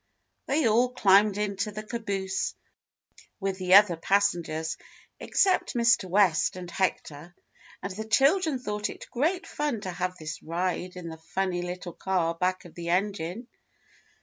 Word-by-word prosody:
They 280 -2 +2
all 235 +3 +3
climbed 200 -1 +4
into 200 0 -1
the 215 +1 -6
caboose 200 -4 -3 0.8
with 195 -1 -2
the 185 0 +5
other 200 -4 +7
passengers, 165 -3 0 0.4
except 375 -8 +1
Mr. 235 -5 +3
West 185 -4 +3
and 180 -1 -8
Hector, 175 -3 -3 0.5
and 195 -1 -4
the 220 +2 -5
chil 275 - +4
dren 315 -7 -1
thought 210 -4 -3
it - - -9
great 345 +9 0
fun 295 - -2
to 185 - -4
have 180 +1 -3
this 155 -1 -6
ride 180 +2 -3
in 175 -2 -7
the 160 - -8
funny 180 +2 -2
little 175 0 -6
car 180 -3 0
back 185 +2 -1
of 175 - -13
the 170 -1 -6
engine. 195 +3 -1
190 Hz, 150 wpm, -27 LUFS, 175-215 Hz, 0.8 s, other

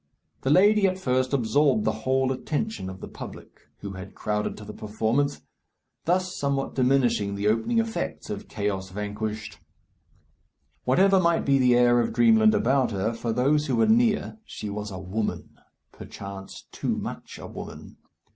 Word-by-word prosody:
The 135 - -1
lady 200 +5 +5
at 185 0 -1
first 130 -6 0
absorbed 145 - +2
the - - +3
whole 130 0 0
attention 150 - -3
of 95 0 -9
the - - -6
public, - - -11
who 100 - -5
had 95 +1 -9
crowded 105 0 -2
to 105 - -10
the 105 - -8
performance, 110 +7 -1 0.6
thus 185 +2 +1
somewhat 140 -1 -1
diminishing 120 -6 +2
the 100 +1 -1
opening 115 - +1
effects 225 0 -2
of 100 -1 -6
"Chaos 100 -3 -3
Vanquished." 105 +2 -5 1.3
Whatever 190 +9 +4
might 170 -2 +2
be 140 -1 +3
the 125 -1 +5
air 120 0 +5
of 120 - 0
dreamland 220 -2 +5
about 130 - +2
her, 105 +2 -1
for 115 0 -3
those 145 +6 +2
who 130 - +1
were 115 - +4
near 225 -1 +2
she 105 - -7
was 105 +1 -4
a 95 - -7
woman; 95 +4 -4 0.3
perchance 100 -1 -9
too - - -2
much - - -6
a - - -9
woman. - - -9
125 Hz, 160 wpm, -26 LUFS, 105-155 Hz, 1.3 s, lady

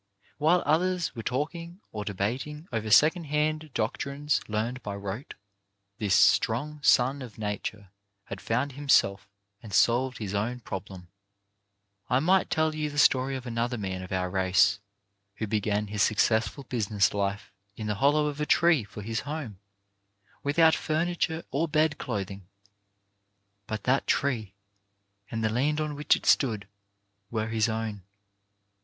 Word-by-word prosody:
While 165 +4 +3
others 180 +2 +1
were 115 - -4
talking, 165 - -3
or 105 -1 -4
debating 125 - -3
over 110 -2 -2
second 160 - +5
hand 155 +1 -1
doctrines 140 +6 -1
learned 115 +4 -2
by 100 -3 -5
rote, 100 +7 -6 0.6
this 100 -4 +2
strong 120 +8 +3
son 135 0 +4
of 120 -5 -9
nature 105 -2 -5 0.3
had 100 -1 -8
found 125 +5 -1
himself 135 -8 +2 0.3
and 110 - -10
solved 120 +5 +3
his 105 -3 -5
own 115 +5 -2
problem: 95 -3 -7 1.0
I 125 - +3
might 185 +6 +3
tell 160 0 +1
you 155 -1 -2
the 145 - -8
story 135 -1 +4
of 130 -1 -6
another 120 +1 -2
man 95 -3 -4
of 95 - -9
our 90 -1 0
race 95 +2 +3 0.6
who 110 - -3
began 105 0 0
his 105 0 -3
successful 110 +5 +2
business 110 -5 0
life 100 0 -2 0.2
in 110 - -6
the 105 - 0
hollow 150 +2 +4
of 150 0 -3
a - - +1
tree 170 -7 +4
for 105 0 -9
his 110 +1 -2
home; 140 -9 -6 0.8
without 160 +3 +4
furniture 165 +1 -1
or 155 +5 0
bed 155 0 +1
clothing. 100 -5 -5 1.2
But 110 -1 -4
that 130 +2 +1
tree, 115 -9 0 0.7
and 115 -1 -3
the 110 - +2
land 145 +6 +1
on 150 -1 -2
which 145 +1 +3
it - - -8
stood, 110 -7 +2 0.6
were 110 -1 -2
his 110 +1 +1
own. 110 -2 -3
120 Hz, 150 wpm, -28 LUFS, 105-150 Hz, 1.2 s, second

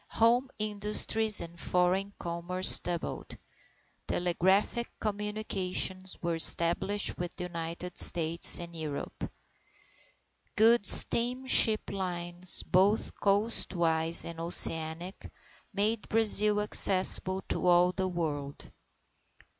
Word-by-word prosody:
Home 240 +3 0
industries 215 +1 -1
and 170 0 -11
foreign 180 +3 -2
commerce 175 +2 +1
doubled. 175 -1 -8 0.7
Telegraphic 190 +6 -2
communications 200 -3 -4
were 170 0 -3
established 175 +6 +2
with 175 -1 -7
the - - -8
United 170 0 -4
States 165 0 +4
and 170 -1 -11
Europe. 155 -3 -9 1.2
Good 225 -1 +2
steamship 245 -2 +5
lines, 175 -2 -4
both 195 +4 -1
coastwise 170 -6 -1
and 165 -1 -11
oceanic, 165 +1 -1 0.4
made 210 +2 -4
Brazil 210 -1 +1
accessible 190 -2 +4
to - - -3
all 175 0 +2
the 185 0 -5
world. 150 -6 -7
185 Hz, 90 wpm, -27 LUFS, 170-210 Hz, 1.2 s, steamship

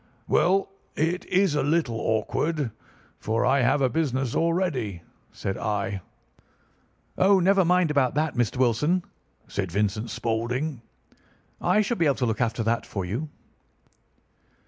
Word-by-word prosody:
"'Well, 195 +2 +2 0.2
it 165 +4 0
is 185 -3 +2
a 145 - +1
little 145 -6 0
awkward, 130 +5 -1 0.5
for 110 +1 0
I 135 +1 +3
have 135 +3 +2
a - - +5
business 135 -4 -1
already,' 155 - 0 0.3
said 95 - -4
I. 100 -2 -2 1.2
"'Oh, 195 0 +5
never 190 +1 +4
mind 180 -2 +3
about 140 -3 +2
that, 155 0 0
Mr. 120 0 0
Wilson!' 140 +9 +2 0.4
said 95 -4 -3
Vincent 105 +4 -1
Spaulding. 120 +4 -2 0.8
'I 215 - +3
should 225 +3 -2
be 165 - +3
able 140 - +3
to 130 - -1
look 110 0 -1
after 115 -1 0
that 115 +1 0
for 95 -3 -4
you. 120 - -3
135 Hz, 140 wpm, -25 LUFS, 115-165 Hz, 1.2 s, a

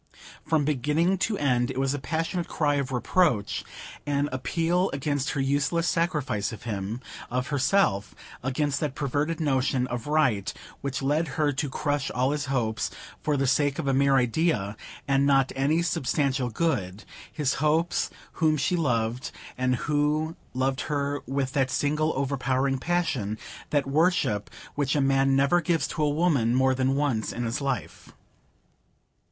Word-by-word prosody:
From 155 -2 +1
beginning 150 +6 +1
to 210 +1 0
end 125 -4 +1
it - - -5
was 135 0 +1
a 145 - -2
passionate 165 +6 -2
cry 145 -2 +1
of 135 -1 -2
reproach; 125 - +1 0.4
an 145 0 +1
appeal 165 +8 0
against 145 +1 -1
her 145 - -2
useless 145 +5 +1
sacrifice 150 - 0
of 110 +1 -9
him, 105 +1 -4 0.3
of 125 +2 -2
herself, 135 - +1 0.3
against 140 +2 0
that 145 -3 -2
perverted 145 +4 -1
notion 135 -4 +1
of 120 0 -5
right 135 -10 +2 0.3
which 140 -1 -3
led 150 +4 +1
her 150 -2 +3
to 140 +1 -2
crush 145 0 -1
all 130 +2 +1
his 150 -1 -2
hopes, 115 -5 -1 0.3
for 150 -2 0
the 135 - +1
sake 145 +1 +2
of 160 - -3
a 135 - +2
mere 135 +1 +4
idea, 125 - +1 0.3
and 140 0 +3
not 135 -2 +3
any 150 +5 +2
substantial 140 -5 0
good,—his 125 - -2
hopes, 160 +3 +2 0.2
whom 155 -2 +2
she 180 +6 +1
loved, 125 -5 0 0.3
and 125 0 +1
who 150 +2 +1 0.2
loved 130 +1 0
her 145 -1 -1
with 135 0 -1
that 135 -2 +2
single 150 +4 +1
overpowering 135 0 0
passion, 135 - -1 0.3
that 145 -2 +1
worship, 140 - +1 0.2
which 145 0 0
a - - +2
man 135 0 +3
never 140 +6 +3
gives 165 0 +1
to 155 - -4
a 150 - +3
woman 145 -7 +2
more 130 0 +4
than 130 +1 +1
once 135 -7 0
in 120 - -3
his 115 +4 -2
life. 135 -2 -4
140 Hz, 155 wpm, -26 LUFS, 130-150 Hz, 0.4 s, mere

